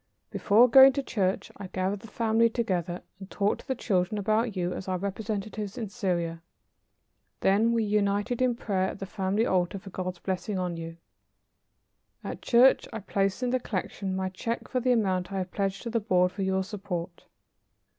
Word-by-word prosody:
Before 225 +4 +5
going 265 +2 +8
to 280 0 -2
church 190 -7 -1
I 200 - -7
gathered 190 +2 -2
the 225 - -12
family 225 +1 +2
together 180 -7 -2 0.2
and 190 -1 -10
talked 205 0 0
to - - -25
the 265 - -1
children 190 -3 0
about 215 +2 +1
you 180 0 -1
as 195 - -6
our 185 -1 0
representatives 205 +2 -4
in 225 -4 -4
Syria. 175 -6 -2 1.0
Then 210 +4 +3
we 230 -1 +2
united 205 +3 0
in 250 -2 +2
prayer 190 -5 -1
at - - -7
the 195 - -5
family 195 +3 0
altar 185 0 +1
for 195 0 -10
God's 185 -1 -4
blessing 185 +2 -3
on 180 -2 -2
you. 165 0 -7 1.3
At - - -6
church 250 +2 +5
I - - -4
placed 195 +1 -1
in 245 - 0
the 255 - +2
collection 195 -3 -3
my 190 0 -1
check 230 +5 -4
for 255 - -1
the 250 +1 +1
amount 190 -6 +1
I 195 - -3
have 185 -1 -3
pledged 195 -1 -2
to 235 - -4
the 230 - +1
Board 180 -3 +2
for 185 - -6
your 190 0 +1
support." 185 -4 -6
200 Hz, 185 wpm, -28 LUFS, 185-225 Hz, 1.3 s, going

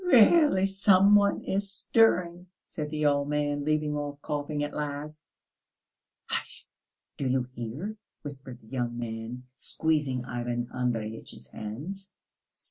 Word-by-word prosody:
"Really 290 - +6
some 195 0 +5
one 205 -1 +4
is 195 0 -1
stirring," 180 -5 +3 0.2
said 150 -2 -5
the 150 0 -1
old 145 0 +2
man, 145 -1 0
leaving 150 0 +1
off 145 -1 -4
coughing 145 0 -2
at 145 - -3
last. 150 +1 -4 1.0
"Hush! - - -4 0.5
Do 135 - -1
you 130 0 +2
hear?" 135 - -5 0.3
whispered 135 -4 -7
the 110 - -19
young 120 -1 -2
man, 115 +1 -5
squeezing 140 -2 0
Ivan 120 -1 -3
Andreyitch's 115 - -3
hands. 150 - -6
145 Hz, 125 wpm, -28 LUFS, 125-180 Hz, 1.0 s, Really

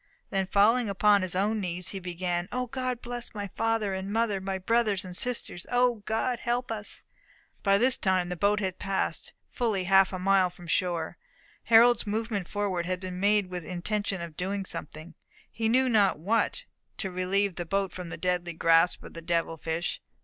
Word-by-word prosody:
Then 195 -1 0
falling 220 +4 +4
upon 200 +1 +4
his 185 -1 -1
own 210 +3 +1
knees, 180 -2 -2
he 195 - -3
began, 175 -1 -3
"O 250 0 -1
God 255 -1 -3
bless 240 -1 -5
my 205 -1 -4
father 225 -1 0
and 190 +1 -4
mother, 215 -3 +1
my 190 0 -2
brothers 210 -1 +1
and 180 -1 -7
sisters! 230 -6 -1
O 245 -2 +2
God 235 +2 0
help 240 0 -1
us!" 210 -2 -4 0.6
By 195 -1 +4
this 250 +4 +3
time 185 -2 +1
the 180 - -3
boat 205 +4 +2
had 185 -2 -3
passed 195 0 -2 0.2
fully 220 -6 0
half 195 +1 +5
a 185 - -3
mile 190 0 +3
from 175 0 -14
shore. 170 -1 -1 0.5
Harold's 235 0 +6
movement 210 -3 -2
forward 190 -4 -2
had 185 0 -1
been 185 -1 -6
made 205 -1 +2
with 180 -1 -3
the 165 - -11
intention 195 +1 -2
of 170 -2 -7
doing 195 +3 -3
something, 155 0 -7 0.4
he 225 -1 -1
knew 260 +3 +4
not 210 -8 +3
what, 225 - 0 0.3
to 190 - -4
relieve 185 +2 0
the 175 - -4
boat 195 +1 -1
from 180 -2 -7
the - - -6
deadly 180 -1 -1
grasp 165 +1 +3
of - - -11
the 165 - -7
devil 165 -1 0
fish. 165 +2 -3
195 Hz, 190 wpm, -28 LUFS, 180-220 Hz, 0.6 s, Harold's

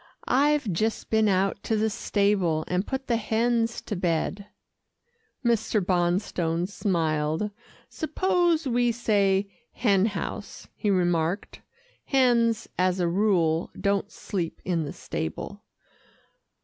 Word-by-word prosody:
"I've 280 -5 +2
just 220 +6 -1
been 220 -1 +4
out 195 +1 +1
to 220 - -1
the 220 0 +1
stable, 200 -7 +1
and 180 +2 -1
put 265 0 -3
the 235 -3 +1
hens 230 +1 0
to 210 - -4
bed." 180 +3 -1 1.0
Mr. 225 -2 +2
Bonstone 175 -2 0
smiled. 165 -1 -1 0.4
"Suppose 345 0 +1
we 245 -1 +2
say 205 -4 +2 0.3
hen 200 -4 +3
house," 205 0 -6
he 210 - -1
remarked. 175 -1 0 0.4
"Hens, 235 -4 +2
as 185 0 +2
a 175 - +2
rule, 170 -3 +2
don't 200 +1 0
sleep 175 -5 -4
in 170 -3 0
the 145 - -6
stable." 80 - -5
200 Hz, 115 wpm, -26 LUFS, 175-230 Hz, 1.0 s, been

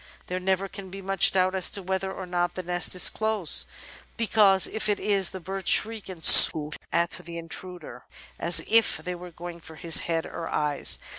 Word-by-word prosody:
There 180 +1 -5
never 190 +1 -2
can 195 -1 -11
be 195 +2 -10
much 195 -1 +1
doubt 185 0 0
as 190 -1 0
to 200 - -5
whether 190 +1 -4
or 190 -1 -8
not 175 -1 -3
the 185 - -6
nest 175 +1 -3
is 180 - +6
close, 215 -6 -2 0.5
because, 210 -4 +2
if 220 -1 -2
it 205 - -1
is, 195 -3 +1
the 190 - -9
birds 190 +2 -6
shriek 220 -2 +2
and 170 -4 -7
swoop 150 -1 +8 0.2
at 170 0 -1
the 170 -1 -6
intruder, 165 -5 -11 0.3
as 170 +1 +3
if 225 -7 +2
they 180 +4 -7
were 180 0 -11
going 170 0 -11
for 160 -1 -15
his 165 0 0
head 165 -1 -4
or 165 - -8
eyes. 150 -1 -1
180 Hz, 200 wpm, -24 LUFS, 170-195 Hz, 0.5 s, swoop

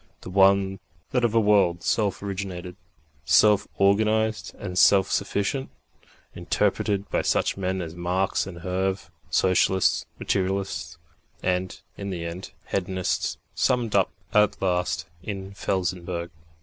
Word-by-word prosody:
The - - -8
one 95 0 +4
was 95 - -9 0.3
that 125 -2 +1
of 115 -1 +1
a - - +6
world 100 -5 +3
self 100 -3 0
originated, 95 -3 -5 0.5
self 105 +6 +4
organised 110 +2 +2
and 90 -3 -6
self 95 0 +5
sufficient, 100 +6 -1 0.6
interpreted 100 -1 0
by - - +1
such - - +1
men 95 -1 -2
as 80 -1 -7
Marx 90 +2 -1
and 85 -3 -9
Herve, 95 +2 -2 0.2
socialists, 95 0 +2
materialists, 95 -4 -2 0.5
and, 90 0 -1 0.2
in 100 0 -5
the 85 -3 -4
end, 85 +3 -6 0.2
hedonists, 95 -1 -1 0.2
summed 120 -4 +1
up 95 -2 +3 0.2
at 105 -2 +3
last 90 -3 0 0.2
in 95 0 -6
Felsenburgh. 90 -3 -2
95 Hz, 125 wpm, -25 LUFS, 90-100 Hz, 0.6 s, a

